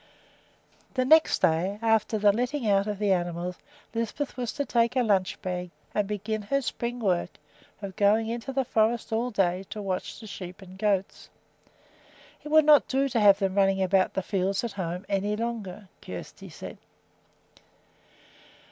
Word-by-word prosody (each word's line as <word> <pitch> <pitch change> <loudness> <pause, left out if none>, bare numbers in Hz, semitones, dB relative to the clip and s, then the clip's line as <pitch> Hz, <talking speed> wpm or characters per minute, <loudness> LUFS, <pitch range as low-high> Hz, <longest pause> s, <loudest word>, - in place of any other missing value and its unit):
The 255 -1 +1
next 315 -3 +5
day 180 +4 +2
after 225 -1 +2
the 205 -1 +5
letting 245 +3 -1
out 200 0 +3
of 210 -1 -2
the 205 -1 +1
animals 175 0 -1 0.4
Lisbeth 230 +5 -3
was 245 -3 -3
to 285 - -2
take 235 0 +1
a 255 - +3
lunch 195 -4 +1
bag 180 -1 -3 0.2
and 210 -2 0
begin 210 +1 -3
her 275 +7 0
spring 240 +1 -3
work 180 -6 -1 0.5
of 195 -2 -6
going 215 +2 +3
into 235 +3 -4
the 265 0 0
forest 225 +1 +1
all 235 +3 0
day 190 -4 0
to 215 - -6
watch 190 -3 -4
the 225 - -11
sheep 185 -3 -8
and 185 0 -13
goats. 195 -1 -1 1.1
It 300 - -7
would 310 0 +6
not 300 -1 +6
do 275 0 +1
to 235 - 0
have 200 -2 +7
them 195 -2 -1
running 195 -1 +3
about 190 0 +2
the 190 - -1
fields 195 +1 -1
at 235 - -2
home 180 -1 -4
any 205 +1 0
longer, 210 -4 -5
Kjersti 90 -1 -9
said. - - -9
205 Hz, 165 wpm, -27 LUFS, 190-235 Hz, 1.1 s, have